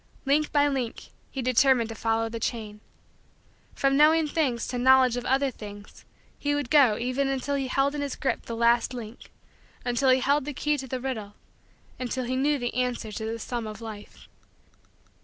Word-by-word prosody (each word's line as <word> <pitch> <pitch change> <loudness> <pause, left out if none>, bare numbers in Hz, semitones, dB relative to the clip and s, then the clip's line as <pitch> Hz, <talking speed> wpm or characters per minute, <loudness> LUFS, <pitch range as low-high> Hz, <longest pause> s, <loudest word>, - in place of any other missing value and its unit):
Link 295 +2 +2
by 290 -1 +4
link, 260 -5 -3 0.2
he 265 - -5
determined 255 -1 +3
to - - -5
follow 225 0 0
the 230 0 -5
chain. 210 -2 -4 0.9
From 275 0 +2
knowing 310 +2 +5
things 280 -7 -1
to 245 - -3
knowledge 260 -1 +5
of 245 0 -4
other 270 +1 +2
things 205 -3 -11 0.3
he 290 0 0
would 290 -4 -3
go 265 -8 +5
even 255 +3 -1
until 270 +1 -2
he 275 -2 -1
held 275 +2 +1
in 295 - -3
his 285 -2 -3
grip 275 - -2
the 230 - -4
last 235 +2 +2
link 230 -1 -9 0.6
until 250 +2 +1
he 255 0 +5
held 280 +1 +2
the 295 -2 -5
key 300 +2 +1
to 270 -2 -5
the 255 0 -3
riddle 220 -6 -5 0.6
until 255 0 -2
he 255 +2 -2
knew 285 +3 +2
the 245 -2 -3
answer 245 -3 -2
to 220 +1 -5
the 225 +1 -3
sum 235 0 -4
of 215 -1 -8
Life. 220 -3 -10
255 Hz, 190 wpm, -26 LUFS, 230-275 Hz, 0.9 s, knowing